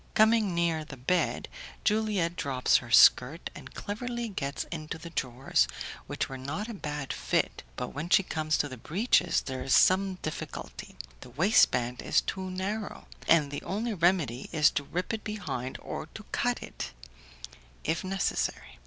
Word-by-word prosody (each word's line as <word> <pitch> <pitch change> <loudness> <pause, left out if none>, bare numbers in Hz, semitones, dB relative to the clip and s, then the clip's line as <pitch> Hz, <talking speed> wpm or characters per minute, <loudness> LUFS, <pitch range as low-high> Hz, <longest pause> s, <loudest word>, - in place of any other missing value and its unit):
Coming 215 -4 +4
near 170 -2 +1
the 150 -3 -10
bed, 155 +9 0 0.4
Juliette 210 -5 +1
drops 130 -5 +2
her 120 - -7
skirt, 125 +7 +6
and - - -11
cleverly 235 +2 -4
gets 140 -8 -3
into 155 -2 -5
the 165 +1 -9
drawers, 125 - +1 0.4
which - - -2
were 135 -1 -7
not 150 - -4
a 235 - -5
bad 150 -7 -4
fit, - - 0
but - - -3
when 150 +5 -5
she 195 - +6
comes 155 -3 0
to 145 - +1
the 130 -2 -8
breeches 180 0 +2
there 130 -1 -5
is 130 0 +3
some 190 0 +4
difficulty; 155 - -6 0.2
the - - -11
waistband 125 - +3
is - - +3
too 190 -1 -4
narrow, 200 +3 -4 0.2
and 155 -4 +4
the 145 - -4
only 220 +4 -2
remedy 165 - +1
is 150 -2 +5
to 145 - -1
rip 180 +8 -3
it 220 - -3
behind 180 - -4
or - - -6
to - - -7
cut - - 0
it, 60 - -7 0.9
if 165 +4 0
necessary. 190 - -2
165 Hz, 160 wpm, -29 LUFS, 140-195 Hz, 0.9 s, skirt